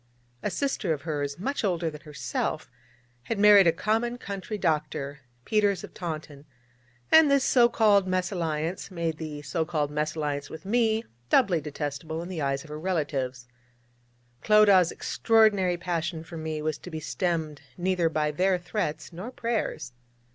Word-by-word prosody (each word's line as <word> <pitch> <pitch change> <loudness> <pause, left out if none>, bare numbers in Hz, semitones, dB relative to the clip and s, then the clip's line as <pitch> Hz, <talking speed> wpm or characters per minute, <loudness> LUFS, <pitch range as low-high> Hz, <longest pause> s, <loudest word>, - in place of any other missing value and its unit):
A - - -1
sister 200 - -1
of 145 -2 -6
hers, 145 -3 -3
much 270 +10 -2
older 175 -5 0
than 150 0 -10
herself, 150 -3 -3 0.5
had 225 - -2
married 205 -2 +7
a - - +6
common 225 +7 -1
country 200 -1 -5
doctor, 150 -4 -1 0.3
Peters 205 -3 +2
of - - -10
Taunton, 155 -4 -6 0.7
and 320 -2 +8
this 280 -1 +4
so 240 -3 +5
called 205 -5 +4
mésalliance 175 -2 -2
made 170 -4 -2
the 150 -2 -6
so 165 +2 -1
called 155 -3 -1
mésalliance 150 -1 -2
with 160 - -10
me 225 +1 +1 0.2
doubly 185 - +4
detestable 150 +2 -4
in 175 - -8
the 175 -4 -4
eyes 140 0 -1
of 160 - -14
her 150 - -5
relatives. 140 -8 -2 0.9
But - - -14
Clodagh's 205 -5 +6
extraordinary 210 -6 +2
passion 170 -2 -3
for 165 - -11
me 155 -1 -4
was 155 -1 -2
to - - -9
be 160 -2 -5
stemmed 160 -3 -2 0.2
neither 180 -2 +1
by 155 -1 0
their 185 +4 +2
threats 175 -3 -4
nor 185 +8 -6
prayers. 230 - -3
170 Hz, 155 wpm, -27 LUFS, 155-200 Hz, 0.9 s, and